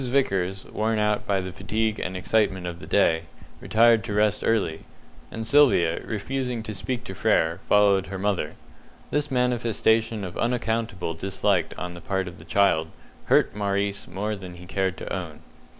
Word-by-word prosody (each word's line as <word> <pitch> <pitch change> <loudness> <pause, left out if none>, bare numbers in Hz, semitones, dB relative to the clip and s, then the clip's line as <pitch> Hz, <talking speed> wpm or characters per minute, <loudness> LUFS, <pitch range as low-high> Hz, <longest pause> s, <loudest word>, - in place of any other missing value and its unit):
Vickers, 95 -8 0
worn 110 +1 -1
out 105 0 0
by 100 -2 +1
the 95 -1 -6
fatigue 110 +3 -1
and 95 +1 -3
excitement 95 -2 +1
of 85 -1 -5
the - - -10
day, 80 -5 +3 0.3
retired 115 0 +4
to 105 -3 -3
rest 105 -1 +2
early; 105 -8 0 0.5
and 110 0 -5
Sylvia, 110 - +4
refusing 125 +2 -3
to 110 - -5
speak 120 +5 -3
to 95 - -7
Frere, 85 -5 +1
followed 100 -2 +4
her 95 - -5
mother. 95 -6 -1 0.6
This 150 0 0
manifestation 115 -3 +1
of 90 -2 -6
unaccountable 115 -7 -1
dislike 95 +4 0
on 90 -1 -5
the 85 - -10
part 95 +1 -2
of 90 - -9
the - - -13
child 95 -6 +2 0.4
hurt - - +3
Maurice 100 -1 -1
more 105 +4 -3
than 90 -3 -9
he 90 +1 -11
cared 95 0 -1
to - - -6
own. 80 -5 -5
100 Hz, 165 wpm, -25 LUFS, 95-110 Hz, 0.6 s, retired